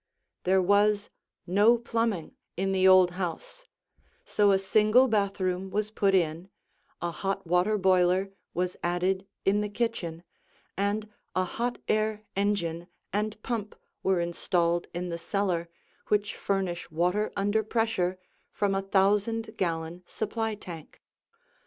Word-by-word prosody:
There 190 0 +4
was 205 +2 +3 0.3
no 205 +6 +5
plumbing 230 -7 -2 0.2
in 195 +1 0
the 190 0 +4
old 185 -1 +7
house, 180 - -5 0.6
so 205 - +3
a 195 - +5
single 215 +6 +4
bathroom 195 -4 0
was 210 +2 -1
put 195 -2 +2
in, 170 +1 0 0.5
a 170 - -1
hot 195 +2 -3
water 180 +5 +2
boiler 185 0 +3 0.2
was 180 0 -1
added 185 +2 0 0.2
in 200 +2 +3
the 210 - -2
kitchen, 200 -7 -3 0.5
and 205 +2 -1 0.3
a 185 - +3
hot 240 +6 -2
air 215 0 0
engine 175 -4 -1 0.3
and 210 +1 -1
pump 225 -4 -3 0.3
were 190 -2 +2
installed 170 0 0
in 175 +1 -4
the 170 0 -4
cellar 175 -2 -1 0.4
which 210 -1 +1
furnish 190 -4 -2
water 180 +6 0
under 205 +2 +1
pressure 220 -5 0 0.3
from 205 -1 0
a 195 - +1
thousand 205 +3 +1
gallon 170 -2 -2
supply 220 0 -2
tank. 170 -6 -10
195 Hz, 130 wpm, -28 LUFS, 180-210 Hz, 0.6 s, old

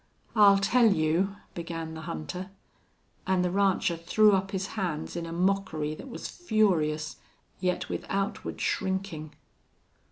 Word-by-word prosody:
"I'll 200 -2 +7
tell 225 +3 +4
you...." 175 +3 +1 0.2
began 165 -1 -5
the 160 - -7
hunter. 160 - -5 0.8
And 185 -1 +2
the 180 - 0
rancher 195 -3 +2
threw 210 +6 +4
up 195 0 +1
his 195 0 -2
hands 175 -8 -3
in 170 -1 -3
a - - -6
mockery 175 -4 0
that 265 - -9
was - - -6
furious, 165 - +1 0.4
yet 180 -1 -1
with - - -4
outward 195 0 -2
shrinking. 190 -5 -2
185 Hz, 135 wpm, -28 LUFS, 160-195 Hz, 0.8 s, I'll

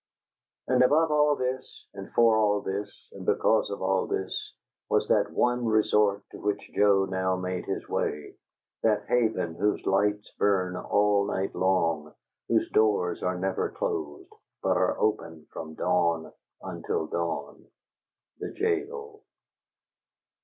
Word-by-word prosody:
And 125 -1 +3
above 155 +5 +4
all 150 -1 +4
this, 130 0 -4
and 100 -1 -9
for 115 -1 +5
all 105 -2 +2
this, 100 +2 -3 0.2
and - - -9
because 110 - +2
of 100 -1 -5
all 95 0 +1
this, 95 - -3 0.4
was - - +2
that - - +3
one 125 0 +1
resort 105 -2 +2
to - - -10
which 105 0 -3
Joe 100 -1 +4
now 95 -1 0
made 90 0 -3
his - - -3
way; 75 0 -2 0.5
that 110 -2 +2
haven 110 -8 +1
whose 105 +5 -1
lights 105 +2 +1
burn 95 -3 +2
all 100 +1 +2
night 95 +1 -2
long, 85 -5 0 0.3
whose - - +2
doors 100 -5 +2
are 90 0 -1
never 95 +1 -1
closed, 75 -2 -4 0.3
but - - +2
are - - +1
open 80 -7 -1
from 80 -1 -7
dawn 85 0 0 0.3
until 80 - -3
dawn 80 -3 -4 0.7
the - - -4
jail. 435 +1 -2
100 Hz, 135 wpm, -27 LUFS, 90-110 Hz, 0.7 s, for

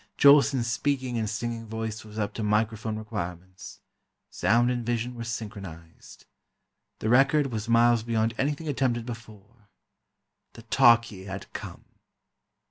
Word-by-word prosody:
Jolson's 140 -3 +6
speaking 125 0 -1
and 110 -2 -2
singing 115 0 -4
voice 110 0 -5
was 105 0 -12
up 105 -2 -2
to - - -5
microphone 110 +1 0
requirements—sound 100 +4 -3
and 120 -1 -2
vision 120 +1 -2
were 120 -1 -6
synchronized. 100 -8 -8 0.7
The 110 - -2
record 135 +3 +4
was 110 0 -4
miles 115 0 +4
beyond 115 0 0
anything 145 +4 -1
attempted 125 -4 0
before. 110 -2 -11 0.9
The - - -13
"Talkie" 115 -5 +3
had 95 -1 -8
come! - - -8
115 Hz, 125 wpm, -27 LUFS, 105-120 Hz, 0.9 s, Jolson's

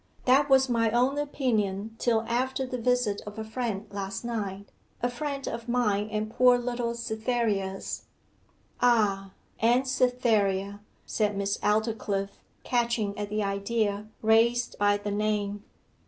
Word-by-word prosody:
'That 275 +3 +4
was 265 0 +5
my 230 -2 +2
own 250 +4 +2
opinion 225 -7 -1
till 230 -2 +2
after 260 +3 -1
the 250 -1 -4
visit 245 -4 +1
of 210 +1 -8
a 220 - -3
friend 220 -2 -3
last 195 +2 -4
night 200 -4 -4 0.3
a - - +4
friend 275 +2 -4
of 230 +1 -5
mine 215 -4 +1
and 215 0 -2
poor 250 +1 +5
little 240 -1 -2
Cytherea's.' 220 -4 -2 0.8
'Ah 205 -5 +3 0.3
and 245 +4 +3
Cytherea,' 215 -6 +1 0.3
said 210 -2 0
Miss 200 0 0
Aldclyffe, 210 -2 -1 0.2
catching 235 -4 0
at 205 -1 -4
the 210 0 -1
idea 200 +1 -1 0.2
raised 235 +2 +3
by 205 0 +3
the 205 0 -4
name. 205 -1 -1
220 Hz, 135 wpm, -28 LUFS, 205-245 Hz, 0.8 s, was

